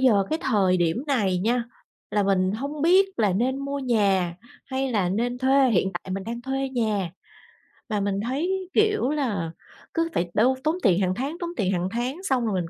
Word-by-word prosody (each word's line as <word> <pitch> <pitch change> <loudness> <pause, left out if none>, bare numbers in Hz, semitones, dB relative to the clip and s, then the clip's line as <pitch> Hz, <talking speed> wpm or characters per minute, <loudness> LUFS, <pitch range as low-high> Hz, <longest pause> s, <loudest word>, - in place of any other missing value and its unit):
giờ 215 -7 +4
cái 315 - 0
thời 195 -7 +3
điểm 175 - 0
này 205 -10 +1
nha, 235 +5 +1 0.5
là 205 - +2
mình 190 -1 +2
hông 280 +6 -4
biết 375 +4 +5
là 210 -4 +2
nên 250 +8 0
mua 280 0 -3
nhà 200 -9 +1 0.3
hay 265 0 -1
là 195 -5 +1
nên 240 +6 -1
thuê, 265 0 +4
hiện 190 -2 +2
tại 175 +1 -6
mình 195 0 -3
đang 235 +1 -5
thuê 270 +1 -2
nhà. 215 -8 -1 0.8
Mà 210 -2 0
mình 200 0 -1
thấy, 360 +8 -1
kiểu 425 - +3
là, 225 - -1 0.4
cứ 330 0 0
phải 175 - -1
đâu 250 +5 +3
tốn 310 +2 +1
tiền 185 -4 +4
hàng 185 -1 +1
tháng, 275 - -3
tốn 345 - -3
tiền 195 -5 +1
hàng 180 -1 0
tháng 255 - -3
xong 260 -10 +1
rồi 215 - 0
mình 165 - -6
235 Hz, 205 wpm, -25 LUFS, 195-275 Hz, 0.8 s, biết